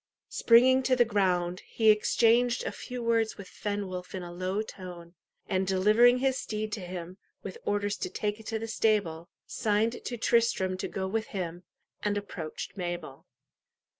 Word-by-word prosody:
Springing 255 +3 +5
to 260 0 +2
the 240 -1 +4
ground, 185 -4 +1
he 220 -2 +3
exchanged 235 +3 +3
a - - -2
few 250 -1 -7
words 230 -1 +1
with 200 -2 -9
Fenwolf 190 -3 -4
in 185 - -4
a 175 - -7
low 185 +4 -2
tone, 175 -4 -10 0.3
and 190 0 0
delivering 215 +6 +5
his 265 0 +1
steed 215 0 -4
to 215 - -3
him, 180 0 -7 0.2
with 465 - -7
orders 205 0 0
to - - -3
take 210 0 -2
it 220 - -12
to 225 - -1
the 225 +1 -5
stable, 200 -7 0 0.2
signed 220 +1 0
to 240 - -4
Tristram 230 -5 +2
to - - -3
go 190 -1 -3
with 220 +3 -2
him, 180 -2 -5 0.4
and 205 0 0
approached 175 -6 -6
Mabel. 175 -7 -5
205 Hz, 165 wpm, -29 LUFS, 185-225 Hz, 0.4 s, Springing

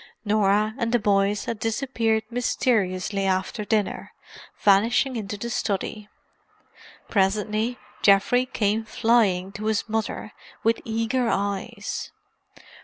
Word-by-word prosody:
Norah 210 +1 +2
and 230 -2 0
the 240 - +4
boys 200 -1 +1
had 230 -2 -4
disappeared 225 -1 0
mysteriously 205 -5 0
after 190 +3 -1
dinner, 210 0 -1 0.5
vanishing 230 +6 +3
into 210 -2 -4
the 235 +3 -5
study. 210 0 -3 1.0
Presently 215 +4 0 0.2
Geoffrey 215 +6 +4
came 215 -2 0
flying 215 -5 +2
to 210 +1 -7
his 220 0 0
mother, 220 -1 -3 0.3
with 225 +1 +2
eager 230 +2 0
eyes. 200 +2 -3
215 Hz, 110 wpm, -24 LUFS, 200-230 Hz, 1.0 s, the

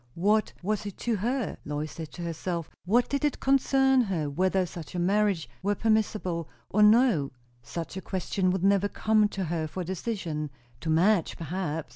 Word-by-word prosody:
What 210 +5 +2
was 210 +2 -1
it 200 - -7
to 235 -3 +1
her? 240 +4 -1
Lois 150 +1 -4
said 160 -2 -7
to 175 - -6
herself; 170 0 -3
what 235 +6 +3
did 280 +1 -2
it 295 - +1
concern 270 -1 +4
her, 170 -10 -1
whether 185 +4 +1
such 170 0 -9
a - - -1
marriage 195 -1 +1
were 205 +2 +1
permissible 210 - 0 0.2
or 210 - +3
no? 210 - +5 0.3
Such 165 +8 -6
a - - -4
question 185 0 -1
would 185 0 0
never 200 0 +3
come 215 0 +3
to 195 -2 -4
her 165 -2 -2
for 180 +4 -5
decision. 175 -5 -3 0.3
To 160 - -4
Madge, 175 +3 +3
perhaps? 165 -3 -3
190 Hz, 175 wpm, -28 LUFS, 165-215 Hz, 0.3 s, no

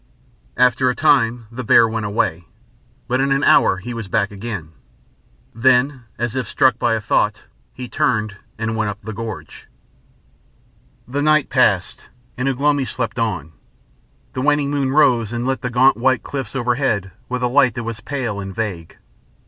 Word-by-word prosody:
After 125 +1 +3
a 125 - -1
time 120 -6 +2
the 125 +2 -6
bear 115 0 +5
went 110 -1 -3
away, 85 -5 -1 0.6
but 125 +2 +1
in 135 0 +1
an 135 +1 +2
hour 95 - +5
he 120 +6 -7
was 115 -3 -6
back 100 0 0
again. 100 -6 -6 0.8
Then, 130 +2 +2
as 120 0 -2
if 130 -4 -2
struck 130 +4 +2
by 115 -1 +2
a - - -1
thought, 105 0 0 0.3
he 125 -1 -8
turned, 110 -4 0 0.2
and 110 0 -2
went 110 -2 0
up 105 0 -6
the 110 - -7
gorge.... 110 -1 -8 1.4
The 140 +4 -2
night 155 -1 +3
passed, - - +1 0.3
and 125 +2 -1
Ugh 135 -1 -3
lomi 145 -1 +2
slept 120 -2 -4
on. 95 -9 -2 0.8
The 130 - -3
waning 145 0 +1
moon 140 -2 0
rose 125 -7 +3
and 120 0 -3
lit 135 0 -1
the 125 - -2
gaunt 125 +2 +4
white 130 0 +1
cliff 135 -4 -5
overhead 120 -6 0 0.2
with 125 0 -3
a - - +3
light 130 0 +3
that 120 - -4
was 115 -1 -5
pale 125 -5 -3
and 95 -1 -7
vague. 95 -8 -5
120 Hz, 175 wpm, -20 LUFS, 110-130 Hz, 1.4 s, bear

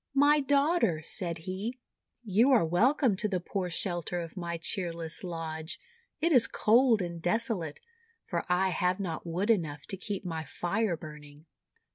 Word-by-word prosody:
:<My 290 +2 +5
daughter," 280 - +2
said 170 -1 -3
he, 200 +7 -4 0.5
:'y°u 210 +6 +4
are 245 -11 +5
welcome 230 - +3
to 210 - +1
the 190 -3 -1
poor 180 +1 -3
shelter 175 0 0
of 165 -2 -7
my 170 -2 -4
cheerless 170 -2 -1
lodge! 160 -2 -5 0.4
It 335 +3 +1
is 250 -6 +6
cold 230 -2 +3
and 170 -1 -6
desolate, 180 -5 0 0.4
for - - -2
I 185 +2 +2
have 180 +2 0
not 175 -3 -4
wood 185 +7 +1
enough 150 -9 -1
to 195 - -2
keep 200 0 -5
my 165 -2 -3
Fire 185 +2 -1
burning! 150 -1 -12
180 Hz, 155 wpm, -29 LUFS, 165-225 Hz, 0.5 s, is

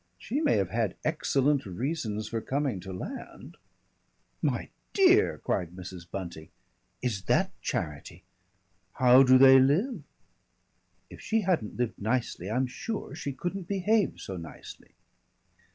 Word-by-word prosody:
She 280 +6 -3
may 310 - +3
have 95 -3 -1
had 110 -5 0
excellent 145 -3 +1
reasons 110 - -3
for 115 0 -3
coming 135 -6 -1
to 95 +2 -8
land 95 - -8 0.5
" - - -44
"My - - -5 0.2
dear!" 390 +1 +5
cried 90 -2 -2
Mrs. 90 -2 -9
Bunting. 85 -5 -7 0.5
"Is 105 -7 -2
that - - +2
charity?" 75 +4 -4 0.7
"How 125 +1 +6
do 130 -1 +7
they 135 0 +8
live?" 170 - +2 1.1
"If - - -11
she 225 0 +1
hadn't 175 - -1
lived 120 -4 -2
nicely 110 -4 -1
I'm 125 +4 +1
sure 205 - -5
she 140 - -4
couldn't 175 +6 -5
behave 200 +2 +1
so 95 - -6
nicely." 85 -2 -11
130 Hz, 135 wpm, -28 LUFS, -, 1.1 s, they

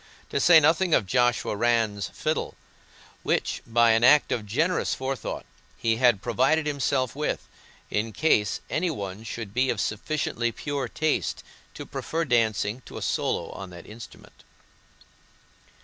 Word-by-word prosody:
To - - 0
say 165 +2 +7
nothing 160 +3 +3
of 105 - +1
Joshua 120 0 +1
Rann's 110 -3 +1
fiddle, - - -2 0.7
which, - - -1
by 115 0 +4
an 115 +1 +3
act 150 +4 +6
of 105 -3 -2
generous 160 - 0
forethought, 130 0 -4 0.3
he 115 -1 +1
had 120 -5 +3
provided 135 +6 +2
himself 135 -4 0
with, 150 +1 -2 0.4
in 110 +2 -1
case 105 -6 +1
any 175 +3 0
one 100 - -5
should 115 -3 -6
be 130 +2 +1
of 115 - -1
sufficiently 120 +1 -1
pure 140 +2 -3
taste 155 +4 -1 0.3
to - - -7
prefer 165 +1 -3
dancing 115 -2 +1
to - - -9
a - - -6
solo - - -1
on 95 -1 -8
that 85 -1 -11
instrument. 115 +2 -13
120 Hz, 145 wpm, -26 LUFS, 110-145 Hz, 0.7 s, say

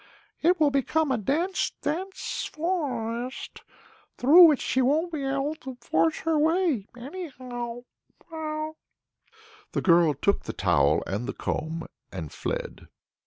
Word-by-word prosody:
It 350 +2 +3
will 300 -2 +4
become 280 +2 +1
a 260 - +2
dense, 330 - 0
dense 370 +6 -3
forest; 255 -8 -3 0.6
through 335 +7 +9
that 295 - +2
she 260 - 0
won't 310 +7 +2
be 295 -3 -2
able 275 +2 -1
to 265 -4 -8
force 160 -8 0
her 320 -2 +1
way 315 - +2
anyhow." 245 -5 -6 0.5
The 310 -1 -8
girl 170 -4 +5
took 200 +9 0
the - - -4
towel - - +2
and 105 +6 -3
the - - -3
comb 160 +1 -3 0.3
and 80 -6 -6
fled. - - -4
275 Hz, 125 wpm, -26 LUFS, 235-320 Hz, 0.6 s, through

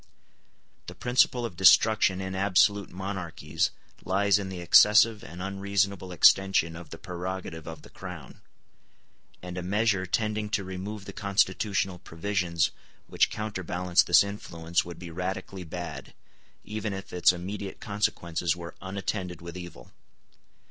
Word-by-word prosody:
The - - -8
principle 125 0 +2
of 105 -7 -6
destruction 95 +1 +5
in 95 0 -4
absolute 100 +1 +3
monarchies 95 -2 -3 0.3
lies 100 +2 +2
in 95 -1 -5
the 95 -2 -6
excessive 105 +5 +6
and 85 +3 -8
unreasonable 100 -1 -1
extension 90 -1 +4
of 85 -2 -10
the - - -8
prerogative 90 -2 -6
of 80 -1 -8
the - - -14
crown; 90 -7 -10 1.0
and 90 0 -5
a - - -4
measure 100 0 +1
tending 105 +2 -1
to 100 -1 -1
remove 95 +2 -6
the - - -8
constitutional 100 -2 0
provisions 85 -1 -1 0.3
which - - +2
counterbalance 90 -4 0
this - - +6
influence 85 -4 -2
would 85 0 -9
be 85 -2 -9
radically 90 +2 -4
bad, 80 -4 -7 0.5
even 105 0 -4
if 95 0 -8
its 90 0 +5
immediate 95 +3 -6
consequences 85 -5 -1
were 85 -1 -8
unattended 95 -2 -4
with 85 +1 -9
evil. 85 -9 -10
95 Hz, 135 wpm, -27 LUFS, 85-100 Hz, 1.0 s, excessive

